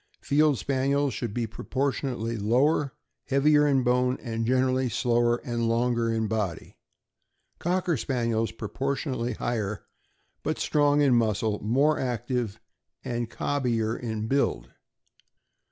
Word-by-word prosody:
Field 150 -1 +3
Spaniels 140 +1 0
should 115 -1 -3
be 120 +2 -1
proportionately 130 0 -2
lower, 130 +7 +2 0.3
heavier 150 +2 +4
in 135 -3 +3
bone, 125 +1 +2
and 115 -2 -3
gen 130 +1 +3
erally 130 -1 0
slower, 120 +1 +2
and 120 -1 -1
longer 115 0 +1
in 110 -1 0
body; 105 -6 -3 0.8
Cocker 175 -1 0
Spaniels, 115 -3 -1
pro 110 - -6
portionately 130 -3 -2
higher, 110 -4 -2 0.6
but - - -2
strong 145 -1 +2
in 140 -3 +4
muscle, 110 -2 +1
more 140 +8 +2
active, 120 -3 -2 0.5
and 120 -1 -2
cobbier 115 -5 -1
in 110 -3 -4
build. 140 +4 0
125 Hz, 120 wpm, -27 LUFS, 115-140 Hz, 0.8 s, heavier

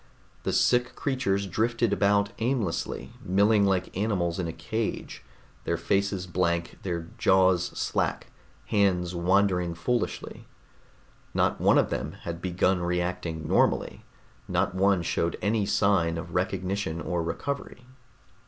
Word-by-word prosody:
The - - -1
sick 125 0 +2
creatures 125 -8 0
drifted 115 +3 0
about 100 0 +2
aimlessly, 115 -7 -2
milling 100 +2 +3
like 95 -1 0
animals 95 -4 0
in 90 - -1
a - - -3
cage, 105 +8 -4 0.4
their 85 - -1
faces 95 +2 0
blank, 85 -1 -1
their 85 -3 -4
jaws 95 -2 +4
slack, - - -1 0.3
hands 90 -4 +1
wandering 90 -1 +2
foolishly. 120 +8 -3 0.9
Not - - +1
one - - +5
of - - +2
them - - -3
had 85 0 -5
begun 90 +1 +1
reacting 85 -2 -2
normally, - - +1 0.4
not - - 0
one 95 -1 +2
showed 85 0 -1
any 105 -1 0
sign 85 -5 +2
of 80 - -7
recognition 95 -3 -1
or 85 +2 -2
recovery. 125 +8 -4
95 Hz, 125 wpm, -27 LUFS, 85-100 Hz, 0.9 s, one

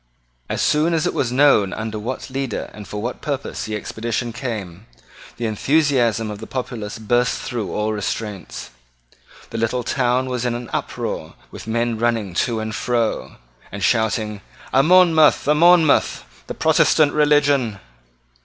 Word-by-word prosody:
As - - -1
soon 160 +3 +2
as 160 - 0
it - - 0
was 120 -3 -1
known 125 -7 +4
under 110 0 -4
what 125 +4 -5
leader 135 -3 -3
and 105 -1 -10
for 105 - -5
what 120 +4 -4
purpose 140 -2 -4
the 110 - -4
expedition 115 +2 -3
came, 110 -6 -6 0.5
the 120 - -3
enthusiasm 120 -2 +1
of 105 - -7
the 110 - -8
populace 120 -5 -5
burst 120 +3 +1
through 115 -5 -4
all 105 +1 -1
restraints. 105 -1 -5 0.8
The 115 - -3
little 120 +2 0
town 125 +1 0
was 125 -2 -2
in 120 -1 0
an 120 -1 -7
uproar - - -4 0.2
with - - -10
men 115 0 -1
running 115 -5 0 0.2
to 115 -2 -2
and 110 0 -4
fro, 120 -2 -1 0.4
and 100 0 -5
shouting 110 -2 0 0.3
"A 135 - +6
Monmouth! 165 -2 +5
a 150 - +5
Monmouth! 165 -1 +4 0.2
the - - -5
Protestant 150 -2 +3
religion!" 145 -7 +3
120 Hz, 155 wpm, -21 LUFS, 110-135 Hz, 0.8 s, A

